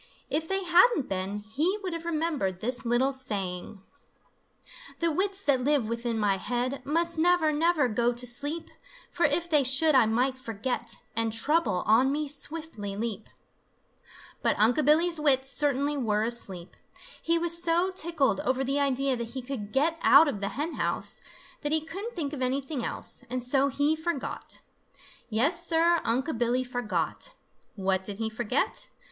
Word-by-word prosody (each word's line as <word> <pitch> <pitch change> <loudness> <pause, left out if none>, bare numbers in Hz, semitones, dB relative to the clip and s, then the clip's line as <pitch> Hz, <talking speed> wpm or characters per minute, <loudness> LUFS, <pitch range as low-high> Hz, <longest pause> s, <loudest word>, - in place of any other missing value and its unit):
If 320 +1 0
they 385 +1 -1
hadn't 360 - +4
been, 195 +2 -3
he 300 - -1
would 365 -2 -3
have 335 0 -6
remembered 305 - -1
this 245 +2 -2
little 245 +3 +2
saying: 200 -6 -4 1.1
The 335 -1 +1
wits 390 +4 -1
that 265 -6 +2
live 285 -4 +2
within 235 0 -2
my 205 -2 +1
head 245 +6 -2
Must 335 +2 0
never, 345 -2 +3
never 315 -2 +2
go 235 +1 +1
to 245 +1 0
sleep, 290 +7 -2 0.4
For - - +2
if 340 0 0
they 300 -4 +3
should 275 +5 +3
I 255 -5 +5
might 255 +4 0
forget 230 0 -3 0.2
And 230 -1 +1
Trouble 230 - +1
on 235 +6 +4
me 300 +1 -1
swiftly 285 -8 -4
leap. 220 -1 -4 1.1
But - - +2
Unc' 235 +8 +3
Billy's 325 +3 +3
wits 270 -3 +3
certainly 285 0 +1
were 215 -5 0
asleep. 195 -7 -2 0.5
He 335 +1 +2
was 340 0 +1
so 345 +3 +2
tickled 335 -7 0
over 265 -3 0
the 275 +2 0
idea 275 -1 +1
that 235 -1 -5
he 260 - -4
could 240 -6 -6
get 320 +6 +1
out 320 - +7
of 210 -8 -3
the 200 - -1
hen 310 +4 -3
house, - - -2 0.4
that 295 - -2
he 315 - +3
couldn't 385 +9 -7
think 305 -5 -3
of 275 - -5
anything 265 +1 -2
else, - - -4
and 250 0 -3
so 270 +2 +2
he 285 +3 +1
forgot. 315 -3 -4 0.7
Yes, 300 +10 +1
Sir, 335 +1 +3
Unc' 250 +2 -1
Billy 245 +1 +1
forgot! 245 - -3 0.4
What 190 -2 0
did 200 0 -5
he 220 0 -2
forget? 240 +3 -1
270 Hz, 165 wpm, -28 LUFS, 230-320 Hz, 1.1 s, out